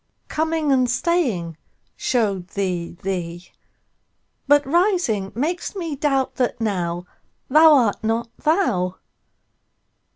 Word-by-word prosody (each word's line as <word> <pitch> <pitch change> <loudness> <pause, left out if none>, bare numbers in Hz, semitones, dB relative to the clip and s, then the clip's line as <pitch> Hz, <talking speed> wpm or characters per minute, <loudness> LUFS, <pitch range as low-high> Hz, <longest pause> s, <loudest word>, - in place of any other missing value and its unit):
Coming 315 -1 0
and 255 -2 +3
staying 245 - 0 0.4
show'd 200 -7 -1
thee 180 -4 -2
thee; 175 -2 -4 1.0
But 290 +1 +5
rising 335 - +1
makes 335 - -2
me 335 -6 -4
doubt 275 -2 0
that 250 -2 0
nowThou 180 -5 -2 0.5
art 295 -10 +5
not 230 +1 -2
thou. 190 - +1
245 Hz, 95 wpm, -22 LUFS, 190-310 Hz, 1.0 s, But